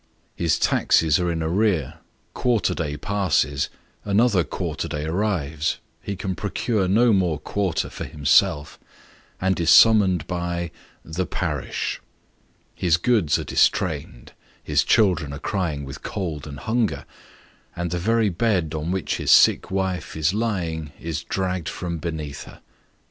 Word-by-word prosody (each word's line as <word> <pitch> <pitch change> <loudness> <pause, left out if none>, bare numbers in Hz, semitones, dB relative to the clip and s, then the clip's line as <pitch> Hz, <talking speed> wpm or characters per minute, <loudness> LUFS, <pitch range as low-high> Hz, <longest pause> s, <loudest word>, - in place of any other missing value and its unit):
His 85 -2 +1
taxes 80 -1 +3
are 90 -1 0
in 80 -1 -2
arrear, 85 -4 0 0.3
quarter 120 -6 +1
day 75 -3 -3
passes 90 -6 0 0.3
by, - - -8
another 105 -4 +4
quarter - - -4
day 75 0 -4
arrives: 80 -4 -1 0.3
ho 100 - -2
can 95 0 -3
procure 105 +1 -1
no 115 +5 +4
more 90 -5 +1
quarter 90 +3 -2
for - - -7
himself, 75 +1 +2 0.6
and 95 0 0
is 85 -1 +1
summoned 95 -8 +6
by 85 -1 -3 0.3
the 85 +2 -3
parish. - - -3 0.7
His 85 -2 +2
goods 90 -6 +2
are - - -4
distrained, - - 0 0.3
his 75 -1 +2
children 90 -10 +2
are - - -5
crying 80 -4 -2
with 70 +3 -9
cold 80 -7 -4
and 70 -1 -8
hunger, 115 0 -1 0.7
and 85 -1 -3
the 90 - -1
very 110 +3 +2
bed 90 -4 0
on 80 +1 -3
which 95 -1 -1
his - - -3
sick - - +6
wife 95 -7 -2
is 80 +3 +1
lying, 85 -9 -2
is 80 -1 -4
dragged 90 -3 -2
from 85 -2 -4
beneath 75 -4 -5
her. - - -14
85 Hz, 145 wpm, -23 LUFS, 80-100 Hz, 0.7 s, summoned